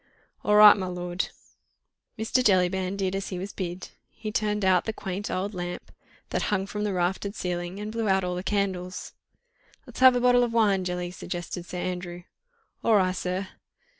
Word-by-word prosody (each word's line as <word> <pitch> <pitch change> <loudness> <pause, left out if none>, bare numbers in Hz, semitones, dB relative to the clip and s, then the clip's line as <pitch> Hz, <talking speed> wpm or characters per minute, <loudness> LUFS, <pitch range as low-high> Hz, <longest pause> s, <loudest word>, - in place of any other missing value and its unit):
"All 210 - +3
ri', 210 0 +10
my 190 -2 -4
lord." 180 0 -3 0.9
Mr. 225 +3 +1
Jellyband 185 -1 +2
did 195 -1 -1
as 195 0 -3
he 185 - -4
was 195 +3 -5
bid—he 185 +4 -7
turned 210 -1 0
out 185 -2 +4
the 220 - -2
quaint 195 0 -5
old 195 +3 -2
lamp 175 -1 -5 0.4
that - - 0
hung 195 -3 0
from 210 +1 -4
the 210 - 0
raftered 190 +3 -1
ceiling 175 0 -3
and 210 +1 -5
blew 225 -2 -1
out 190 0 +3
all 180 0 -1
the 180 - -3
candles. 185 -2 -2 0.7
"Let's - - -10
have 260 -1 +8
a - - +2
bottle 245 0 +5
of 235 -1 -1
wine, 200 -5 +3
Jelly," 180 0 -3
suggested 175 0 -6
Sir 180 - -6
Andrew. 180 -1 -4 0.6
"All 225 - +4
ri', 185 -2 +3
sir!" 185 +1 -3
190 Hz, 180 wpm, -26 LUFS, 180-210 Hz, 0.9 s, ri